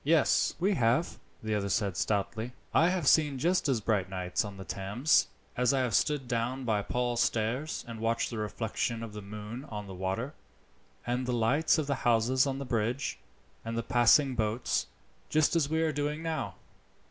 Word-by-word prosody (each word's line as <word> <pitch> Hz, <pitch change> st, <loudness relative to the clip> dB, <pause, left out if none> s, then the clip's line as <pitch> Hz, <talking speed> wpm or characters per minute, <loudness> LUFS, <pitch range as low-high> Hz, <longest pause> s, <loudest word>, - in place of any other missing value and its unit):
"Yes, 155 Hz, 0 st, +3 dB
we 195 Hz, +4 st, +2 dB
have," 125 Hz, +1 st, +1 dB, 0.2 s
the 110 Hz, 0 st, -1 dB
other 100 Hz, -1 st, -1 dB
said 100 Hz, -3 st, 0 dB
stoutly. 110 Hz, +5 st, -1 dB, 0.2 s
"I 165 Hz, -, +5 dB
have 180 Hz, -5 st, -1 dB
seen 150 Hz, -3 st, +4 dB
just 170 Hz, +2 st, +1 dB
as 125 Hz, -5 st, +1 dB
bright 100 Hz, -3 st, 0 dB
nights 90 Hz, 0 st, -1 dB
on 100 Hz, -2 st, -7 dB
the 95 Hz, -, -7 dB
Thames. 100 Hz, +5 st, +2 dB, 0.3 s
I -, -, -3 dB, 0.2 s
have 125 Hz, -4 st, 0 dB
stood 145 Hz, 0 st, +1 dB
down 120 Hz, +3 st, -1 dB
by 110 Hz, -3 st, +1 dB
Paul's 120 Hz, +2 st, -1 dB
Stairs 120 Hz, +8 st, -1 dB
and 115 Hz, -1 st, -7 dB
watched 115 Hz, +2 st, 0 dB
the 115 Hz, -, -4 dB
reflection 115 Hz, +2 st, -2 dB
of 110 Hz, -2 st, -7 dB
the 105 Hz, -, -6 dB
moon 105 Hz, +5 st, -7 dB
on 105 Hz, -6 st, -6 dB
the 95 Hz, -, -8 dB
water, 95 Hz, +9 st, -3 dB, 0.7 s
and 125 Hz, +1 st, -1 dB
the 125 Hz, -, 0 dB
lights 125 Hz, +9 st, +3 dB
of 155 Hz, -, 0 dB
the 140 Hz, -, 0 dB
houses 120 Hz, +3 st, +3 dB
on 135 Hz, -1 st, -2 dB
the 140 Hz, -, -5 dB
bridge, 120 Hz, +2 st, -1 dB, 0.4 s
and 115 Hz, 0 st, -4 dB
the 115 Hz, -, -1 dB
passing 125 Hz, +4 st, +4 dB
boats, 110 Hz, 0 st, -1 dB, 0.4 s
just 155 Hz, +1 st, +3 dB
as 150 Hz, -4 st, +2 dB
we 160 Hz, +1 st, +1 dB
are 160 Hz, -, +1 dB
doing 150 Hz, +2 st, -2 dB
now. 160 Hz, -1 st, -3 dB
120 Hz, 185 wpm, -30 LUFS, 110-140 Hz, 0.7 s, I